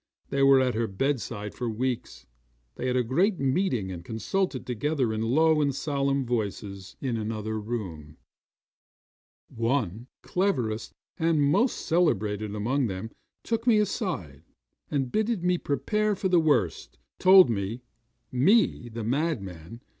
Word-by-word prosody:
They 140 - +1
were 135 -1 +7
at 130 -1 +2
her 115 +1 0
bedside 105 -2 -2
for 120 -2 -3
weeks. 125 +2 -3 0.5
They 130 - -4
had 125 - 0
a 125 - +2
great 180 - +1
meeting 130 - 0
and 85 -2 -7
consulted 130 - -2
together 125 0 -1
in 110 - -2
low 155 +7 +3
and 140 -2 +1
solemn 140 -1 0
voices 100 -4 -4
in 125 -4 -1
another 110 0 -3
room. 90 -10 -6 1.3
One, 115 -2 -1 0.2
the - - -19
cleverest 125 - 0 0.3
and 165 -1 +2
most 175 - +2
celebrated 105 - +1
among 125 +5 0
them, 95 +3 -5 0.3
took 230 +1 -2
me 230 -3 +6
aside, 180 - -2 0.5
and 135 -4 -1
bidding 215 -4 0
me 180 -1 +2
prepare 210 +8 0
for 190 - -1
the 180 -2 +5
worst, 145 - 0 0.2
told 185 -6 +7
me 110 +3 -3 0.5
me, 140 - +3
the 115 0 -6
madman! 115 - -3
125 Hz, 140 wpm, -27 LUFS, 110-160 Hz, 1.3 s, were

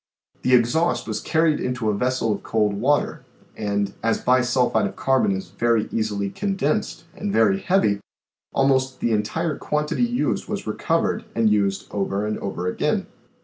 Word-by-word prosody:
The 125 - +4
exhaust 125 +8 +2
was 110 -1 -3
carried 160 -1 +2
into 125 -4 -1
a - - -1
vessel 125 0 0
of 100 - -5
cold 105 -2 +1
water 140 +8 0 0.3
and 100 -1 -1
as 115 0 +1
bi 130 0 +3
sulphide 125 0 +2
of - - -8
carbon 135 -6 +2
is 95 -2 -3
very 115 +3 +1
easily 105 -3 -1
condensed 200 -2 -1
and 205 +1 -3
very 100 - +3
heavy, 180 - +2 0.5
almost 130 -1 +1
the 120 - 0
entire 145 +10 -1
quantity 150 +5 -1
used 240 -11 0
was - - -4
recovered - - 0
and 115 -2 +3
used 100 -2 +1
over 100 0 -1
and 105 0 -2
over 95 -2 -4
again. 90 - 0
115 Hz, 160 wpm, -23 LUFS, 105-140 Hz, 0.5 s, The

